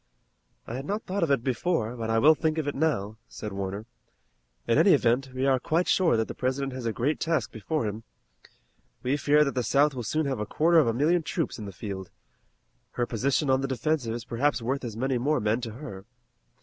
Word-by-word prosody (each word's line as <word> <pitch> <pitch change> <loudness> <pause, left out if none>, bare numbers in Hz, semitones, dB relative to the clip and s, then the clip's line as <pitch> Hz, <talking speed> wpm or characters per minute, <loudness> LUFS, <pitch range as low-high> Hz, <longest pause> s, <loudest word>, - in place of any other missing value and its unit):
"I - - -7
had 135 +3 -5
not 210 +2 -2
thought 195 +2 -3
of 165 - +1
it 135 -4 +2
before, 125 -2 -1
but 115 -2 -4
I 115 - +2
will 150 +7 +7
think 155 0 -1
of 155 -2 -1
it 145 - -1
now," 110 -9 -1
said 105 -2 -7
Warner. 100 +2 -4 0.8
"In - - +3
any - - +6
event, 125 +3 +1
we 130 +1 -2
are 135 -1 +3
quite 165 +6 0
sure 170 -11 +3
that 110 - 0
the - - -5
President 130 +1 -2
has 130 -2 -4
a - - +1
great 135 +7 -1
task 165 -1 0
before 120 +4 -2
him. 105 +1 -4 1.0
We 130 +3 +1
hear 145 +1 +4
that 140 - -1
the 125 - 0
South 140 +5 +3
will 125 - -4
soon 155 +7 -1
have 135 -4 -2
a 105 - -2
quarter 165 +2 +4
of 145 - +3
a - - +3
million 160 +8 +2
troops 160 -4 -3
in 105 - -6
the 100 - -6
field. 95 -1 -6 0.8
Her 120 - 0
position 135 +5 0
on 130 0 +3
the 135 - -1
defensive 130 -2 -1
is 120 -1 -6
perhaps 140 +5 0
worth 130 +4 -2
as 115 -3 -5
many 130 +1 0
more 150 +4 +1
men 110 +2 0
to 115 -3 -5
her. 110 -7 -9
130 Hz, 225 wpm, -27 LUFS, 115-150 Hz, 1.0 s, will